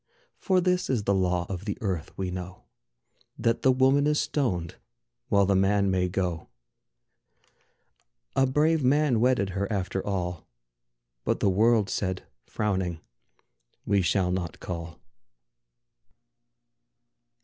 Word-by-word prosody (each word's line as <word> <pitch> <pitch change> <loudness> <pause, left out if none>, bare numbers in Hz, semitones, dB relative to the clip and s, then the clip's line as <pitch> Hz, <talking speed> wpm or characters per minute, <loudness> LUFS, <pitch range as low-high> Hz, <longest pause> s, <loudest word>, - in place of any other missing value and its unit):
For 185 -1 +2
this 180 0 +1
is 120 -6 0
the 100 - +1
law 90 -2 +1
of 95 0 -6
the 105 - -3
earth, 95 -8 -3
we 95 -1 -3
know: 90 0 -7 0.7
That 115 0 0
the 130 - +5
woman 135 +3 +3
is 150 0 +2
stoned, 90 - -1 0.5
while 100 -1 +4
the 100 +1 +2
man 100 +1 +2
may 90 -1 +1
go. 90 -3 -2 1.9
A 135 - +3
brave 150 +3 +2
man 135 -2 +3
wedded 120 -5 +2
her 100 +3 -3
after 95 -1 -2
all, 90 -4 -3 0.8
But - - 0
the 100 - +2
world 110 +1 +3
said, 95 -3 -3 0.2
frowning, 95 -6 -2 0.9
"We 100 -1 +2
shall 90 0 +1
not 90 -2 -3
call." 85 -2 -6
100 Hz, 125 wpm, -27 LUFS, 90-125 Hz, 1.9 s, the